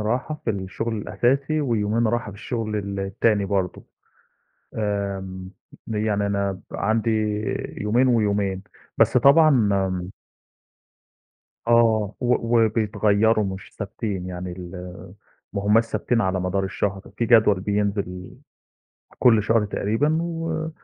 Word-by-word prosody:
راحة 125 +8 -2
في - - +1
الشُغل 100 +3 -3
الأساسي 135 +8 0
ويومين 115 -3 +1
راحة 115 -1 -1
في 100 - -12
الشُغل 110 0 -3
ال 100 -1 -3
التاني 100 +2 +1
برضه. 95 -2 -2 0.9
آمم، 100 -3 -3 0.4
يعني 105 -2 0
أنا 100 -1 0 0.2
ب - - -5
عندي 110 +2 0 0.7
يومين 120 +5 +2
ويومين. 100 -5 +1 0.3
بس 125 - +4
طبعًا 140 -4 +5 2.0
آه، 110 -3 +3
و - - -4 0.4
وبيتغيّروا 110 0 +2
مش 95 -1 -6
ثابتين، 100 -2 -4
يعني 90 0 -5
ال 90 0 -8 0.8
ما 100 - -3
همّاش 110 +3 +5
ثابتين 115 +1 -1
على 95 -2 0
مدار 90 +2 -1
الشهر. 95 +1 -2
في 115 - 0
جدول 110 -4 +5
بينزل 100 -2 -2 0.9
كل 115 -4 +5
شهر 110 +1 +2
تقريبًا 115 +10 0
و 165 -1 -3
105 Hz, 115 wpm, -23 LUFS, 100-115 Hz, 2.0 s, طبعًا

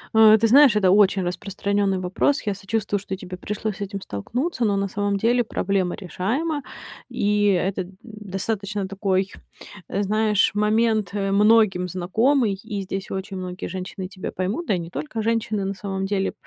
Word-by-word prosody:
Э, 220 0 +8
ты 225 - +3
знаешь, 265 -2 +7
это 190 -3 +4
очень 195 -2 +4
распространённый 200 +2 -1
вопрос. 190 +10 +1
Я 205 - 0
сочувствую, 205 0 -2
что 190 -1 -5
тебе 185 -1 -8
пришлось 210 +1 -4
с - - -11
этим 200 0 -4
столкнуться, 245 - -3
но 200 -1 +2
на 195 0 0
самом 205 +1 -1
деле 240 +3 +2
проблема 190 -4 -1
решаема, 245 - -2 0.5
и 210 -4 +1
это, 190 0 +1
э, - - -5 0.2
достаточно 205 -1 -4
такой, 195 0 0 0.6
э, 200 +1 -1
знаешь, 210 0 +2
момент, 215 0 +2
э, 195 -1 -1
многим 210 -3 +4
знакомый, 220 - +1
и 210 -3 -4
здесь 195 0 -5
очень 190 0 -4
многие 180 0 -5
женщины 185 +1 -6
тебя 185 -1 -6
поймут, 200 - -3
да 200 - +2
и - - -2
не 165 - -7
только 150 +11 -4
женщины, 220 -3 0
на 195 - -2
самом 195 0 -4
деле. 195 -1 -1
200 Hz, 170 wpm, -23 LUFS, 190-220 Hz, 0.6 s, Э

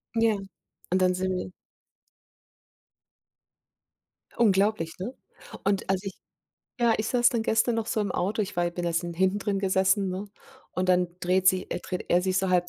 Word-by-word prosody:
Ja, 225 -1 +3 0.6
und 185 0 +2
dann 185 0 +4
sind 185 0 -1
wir 180 0 -4 2.9
Unglaublich, 200 -6 +2
ne, 240 +8 -4 0.5
und 195 -1 0
als 190 +1 +1
ich 195 - -5 0.7
ja, 235 -1 +4
ich 215 - -2
saß 240 -1 +4
dann 230 -3 -1
gestern 225 +2 +2
noch 225 -1 -1
so 220 - -1
im 200 -3 -1
Auto, 200 +6 -1
ich 200 -3 -3
war 175 - +2
ja 175 - 0
bin 175 0 -4
erst 170 +1 0
hinten 185 +4 0
drin 200 -1 -1
gesessen, 190 0 +2
ne, 185 +2 -4 0.5
und 185 0 -1
dann 180 -1 +3
dreht 185 +2 +1
sie 185 0 +3
äh, - - -2
dreht 180 - -5
er 175 +1 +3
sich 185 0 +1
so 190 0 0
halb 180 -1 +2
190 Hz, 180 wpm, -27 LUFS, 180-210 Hz, 2.9 s, dann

